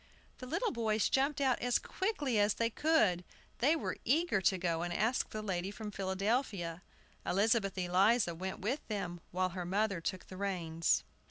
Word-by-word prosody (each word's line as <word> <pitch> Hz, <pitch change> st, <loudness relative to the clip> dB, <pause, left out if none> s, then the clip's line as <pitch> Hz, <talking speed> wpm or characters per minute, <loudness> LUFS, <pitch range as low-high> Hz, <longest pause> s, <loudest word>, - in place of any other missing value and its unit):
The 255 Hz, -, -7 dB
little 465 Hz, -, 0 dB
boys 220 Hz, -2 st, +1 dB
jumped 275 Hz, +2 st, +1 dB
out 260 Hz, -3 st, +2 dB
as 245 Hz, 0 st, +2 dB
quickly 300 Hz, -, -1 dB
as 205 Hz, 0 st, +3 dB
they 230 Hz, 0 st, 0 dB
could; 220 Hz, -, +2 dB, 0.4 s
they 290 Hz, +7 st, +4 dB
were 320 Hz, -, -3 dB
eager 310 Hz, -, +2 dB
to 190 Hz, +1 st, +3 dB
go 170 Hz, -2 st, -1 dB
and 175 Hz, 0 st, -2 dB
ask 220 Hz, +8 st, +1 dB
the 215 Hz, 0 st, -5 dB
lady 185 Hz, -2 st, -2 dB
from 210 Hz, 0 st, -6 dB
Philadelphia. 195 Hz, -2 st, -1 dB, 0.4 s
Elizabeth 200 Hz, 0 st, +2 dB
Eliza 185 Hz, +2 st, +3 dB
went 190 Hz, +3 st, -5 dB
with 245 Hz, +9 st, 0 dB
them, 180 Hz, -5 st, -4 dB
while 185 Hz, +1 st, 0 dB
her 180 Hz, 0 st, -5 dB
mother 195 Hz, 0 st, 0 dB
took 185 Hz, +2 st, -3 dB
the 185 Hz, -, -10 dB
reins. 170 Hz, -4 st, 0 dB
200 Hz, 170 wpm, -33 LUFS, 180-240 Hz, 0.4 s, they